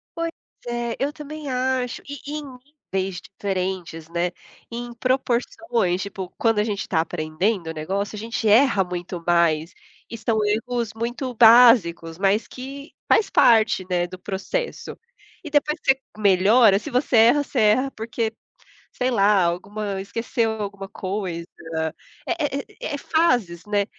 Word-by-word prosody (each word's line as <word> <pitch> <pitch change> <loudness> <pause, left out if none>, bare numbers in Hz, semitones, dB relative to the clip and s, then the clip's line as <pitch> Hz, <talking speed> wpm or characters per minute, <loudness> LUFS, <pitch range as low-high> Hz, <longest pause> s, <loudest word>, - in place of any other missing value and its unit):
Pois 335 0 -2 0.4
é, 240 -1 -2
eu 280 +2 0
também 300 -1 -7
acho. 255 -1 -1
E 285 - -6
e - - -4
em - - -8 0.5
níveis 190 -2 -1
diferentes, 185 -4 -4
né, 175 +1 -1 0.4
em 240 0 -6
proporções 235 -6 0
Tipo, 190 -2 -6
quando 225 -2 +2
a - - +3
gente 205 -2 -2
está 160 -3 0
aprendendo 165 +3 -2
o - - -4
negócio, 195 +7 -3
a - - -6
gente 225 0 -3
erra 215 -2 +5
muito 175 -1 -6
mais. 170 -1 +2 0.4
E 230 - -6
são 225 0 0
erros 230 +1 -1
muito 240 +3 -3
básicos, 220 -9 +6
mas 200 +3 +1
que 275 +3 -9 0.2
faz 400 -3 +4
parte, 215 -5 +4
né, 175 -1 +1
do 185 - -9
processo. 205 - -4 0.5
E 310 - -7
depois 300 +2 +1
que 270 - +5
você 265 - -25 0.2
melhora, 200 +2 +5
se 300 - -7
você 250 -1 +1
erra, 240 +6 +6
você 265 - -3
erra, 250 +6 +3
porque, 225 0 -3 0.6
sei 255 +1 -1
lá, 200 -3 +4
alguma 195 +3 -2
esqueceu 230 +2 -1
alguma 200 -1 -5
coisa. 185 -4 -4 0.8
É - - -1
é 280 - -2 0.3
é - - -4
é - - -4
fases, 245 - +1
né? 205 -1 +1
215 Hz, 155 wpm, -23 LUFS, 185-250 Hz, 0.8 s, básicos